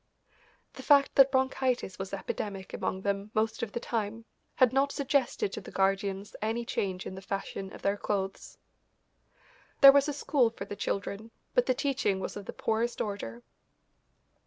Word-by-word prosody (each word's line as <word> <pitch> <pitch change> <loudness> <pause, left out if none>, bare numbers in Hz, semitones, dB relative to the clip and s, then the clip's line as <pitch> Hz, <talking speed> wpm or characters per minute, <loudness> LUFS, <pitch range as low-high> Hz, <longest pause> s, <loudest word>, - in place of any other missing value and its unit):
The - - -9
fact 280 -2 +5
that 270 -1 +6
bronchitis 260 -6 0
was 190 0 -5
epidemic 195 0 -5
among 190 +1 -3
them 200 +1 -1
most 220 +2 0
of 230 -3 -3
the - - -2
time 225 -1 -3 0.3
had 255 -2 +4
not 275 +1 +2
suggested 270 -8 0
to - - -4
the - - -10
guardians 195 +1 0
any 225 +2 -1
change 190 -4 -2
in - - -5
the 190 - -8
fashion 195 0 -5
of - - -12
their 200 +1 +1
clothes. 195 -2 -3 1.2
There 275 -1 +12
was 280 +1 +3
a - - -1
school 275 -3 +2
for 225 - -8
the 205 - -6
children, 200 +2 -3 0.2
but - - +3
the 255 - +3
teaching 250 -8 0
was - - -4
of 205 -1 -7
the - - -3
poorest 230 +2 -1
order. 160 - -4
215 Hz, 170 wpm, -30 LUFS, 195-255 Hz, 1.2 s, There